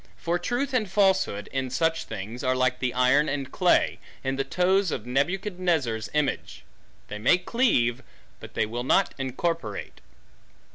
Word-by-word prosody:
For 175 +1 -1
truth 250 +8 -2
and 220 -6 +1
falsehood, 190 - +2
in 130 -1 -2
such 165 +5 0
things, 110 +7 -6
are 130 -1 +2
like 130 0 +1
the 125 -1 0
iron 130 +4 +3
and 140 -2 -3
clay, - - +2 0.2
in 135 0 -1
the 135 - 0
toes 185 +4 +2
of 115 -7 -4
Nebuchadnezzar's 160 - -1
image; 150 -3 -1 0.4
they 105 - -6
may 125 +11 +4
cleave, 180 - +1 0.4
but - - -12
they - - +2
will 120 +3 -4
not 130 - +2
incorporate. 130 - -3
135 Hz, 150 wpm, -26 LUFS, 125-180 Hz, 0.4 s, may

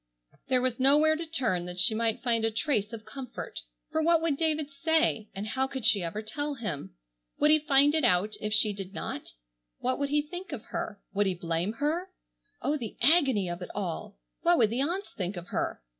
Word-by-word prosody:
There 255 -1 +2
was 255 -1 0
nowhere 295 +4 +5
to 330 +1 -5
turn 225 - 0
that 180 0 -4
she 220 +5 +5
might 225 0 0
find 230 -2 +2
a 225 - +3
trace 220 -2 -1
of 220 -2 -8
comfort. 255 +1 -7 0.3
For 315 +1 +1
what 335 +1 +4
would 325 -3 0
David 310 -1 0
say, 280 -7 +1
and 195 +2 -4
how 260 +5 0
could 265 -3 -4
she 200 - +5
ever 175 +6 -4
tell 290 +7 -3
him? 160 - -5 0.4
Would 300 +1 +4
he 310 - +7
find 290 -1 +4
it 315 -2 +2
out 210 -2 +3
if 210 - -2
she 215 -1 +5
did 195 0 -7
not? 145 - -5 0.4
What 255 +2 -1
would 280 0 -1
he 295 +1 +2
think 355 +2 -7
of 235 -6 -6
her? 205 - -4
Would 205 0 +2
he 185 - 0
blame 170 +3 -2
her? 310 +9 -1 0.5
Oh, 300 +2 +1
the 230 -6 -7
agony 265 - +4
of 175 +1 -5
it 180 - -6
all! 180 - -4 0.2
What 175 - +4
would 220 -3 +3
the 245 +3 0
aunts 355 +8 -2
think 185 0 -4
of 175 0 -8
her! - - -2
240 Hz, 215 wpm, -29 LUFS, 205-295 Hz, 0.5 s, he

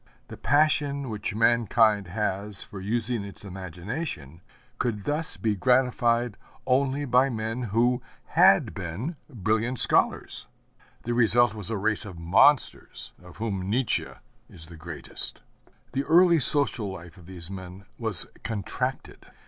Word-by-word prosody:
The - - -8
passion 145 -2 +1
which 105 -1 -4
mankind 115 -3 +3
has 100 +1 -2
for 95 - -10
using 115 +2 -1
its 100 0 -8
imagination 90 - -6 0.4
could 110 -5 -2
thus 155 +6 -1
be 110 -3 0
gratified 120 0 +1 0.3
only 135 +2 +1
by 130 +1 +3
men 115 +1 -3
who 120 +4 +1 0.3
had - - +4
been 95 - -5
brilliant 115 +1 -1
scholars. - - +1 0.6
The 120 - -2
result 120 0 +4
was 105 -2 0
a 110 - -2
race 110 +3 +2
of 95 -4 -9
monsters, 95 - +2
of 90 0 -15
whom 100 -4 -3
Nietzsche 120 +3 0 0.4
is 80 0 -13
the 85 - -11
greatest. 80 0 -6 0.5
The 135 +2 -1
early 170 0 +5
social 125 -7 +2
life 90 -2 -11
of 85 - -16
these 90 -1 -9
men 95 0 -9
was 110 -6 +5 0.2
contracted. 115 +4 -4
110 Hz, 130 wpm, -26 LUFS, 95-125 Hz, 0.6 s, early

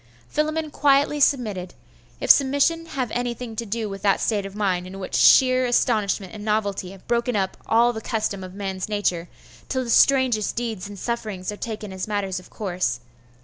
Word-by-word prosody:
Philammon 310 0 -1
quietly 285 +1 +3
submitted 210 -11 +1 0.4
if - - +6
submission 285 +4 +3
have 260 -7 -3
anything 240 -1 -3
to 230 +1 -4
do 220 +1 -2
with 195 -1 -7
that 200 -2 +2
state 205 -3 0
of 195 - -12
mind 185 -4 -1
in 190 +1 -9
which 185 - -7
sheer 255 -1 +6
astonishment 210 -5 +1
and 210 -1 -8
novelty 205 -3 -1
have 195 0 -14
broken 235 0 0
up 190 -2 -1
all 235 +2 +4
the 220 - -6
custom 210 -3 -2
of 185 0 -9
man's 195 -1 -4
nature, 180 -5 -1 0.4
till 260 -1 -1
the 235 - -3
strangest 255 -6 +3
deeds 225 -5 -3
and 205 - -9
sufferings 210 -4 -4
are - - -6
taken 215 -3 -6
as 190 +1 -4
matters 195 -3 -2
of 180 - -16
course. 180 - -2
215 Hz, 185 wpm, -23 LUFS, 195-245 Hz, 0.4 s, if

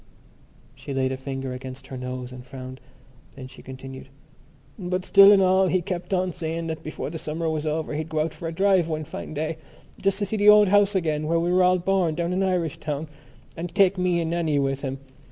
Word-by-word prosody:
She 135 +1 -7
laid 130 -1 +1
a - - -1
finger 135 0 -5
against 130 +1 -8
her 130 - -8
nose 125 0 -5
and 125 -1 -9
frowned: 130 0 -9 0.6
then 135 -2 -9
she - - -14
continued: 130 0 -10 0.7
"But 180 0 -2
still 195 0 +8
and 195 -2 +6
all 190 +1 +4
he 185 0 +1
kept 175 -1 -5
on 185 -2 0
saying 165 -1 -4
that 160 -1 -4
before 155 -1 -5
the 165 - -5
summer 160 +2 -3
was 155 -1 -2
over 155 0 -2
he'd 155 +2 -3
go 155 -1 0
out 160 +1 -2
for 165 - -6
a - - -3
drive 190 0 +3
one 155 -1 -3
fine 155 - -7
day 155 +2 -2 0.4
just 195 0 +1
to 205 - 0
see 215 +3 -3
the 205 0 +5
old 210 -1 +7
house 205 0 +4
again 155 -4 0
where 165 +1 +2
we 175 +1 0
were 185 - +4
all 180 0 +4
born 180 -3 +1
down 170 +1 -1
in 185 - 0
Irishtown 160 -5 -2 0.5
and 170 +1 -6
take 195 -1 +4
me 180 -1 +2
and 165 -1 -2
Nannie 165 -4 0
with 135 -1 0
him. 135 -1 -3
160 Hz, 225 wpm, -24 LUFS, 140-185 Hz, 0.7 s, still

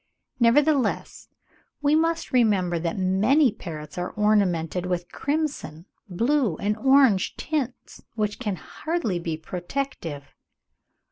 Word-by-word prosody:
Nevertheless, 260 0 +2 0.5
we 290 0 +2
must 330 +1 +1
remember 200 -8 +2
that 170 +2 -3
many 210 +9 +3
parrots 160 -5 -8
are 180 - -2
ornamented 185 -5 +1
with 175 -1 -3
crimson, 285 - -3 0.2
blue, 230 - +1
and 210 +1 -1
orange 265 -5 +4
tints, 280 -5 -4
which 210 0 -2
can 210 -6 -2
hardly 305 - -3
be 165 -2 -3
protective. 175 - -5
210 Hz, 110 wpm, -25 LUFS, 175-275 Hz, 0.5 s, orange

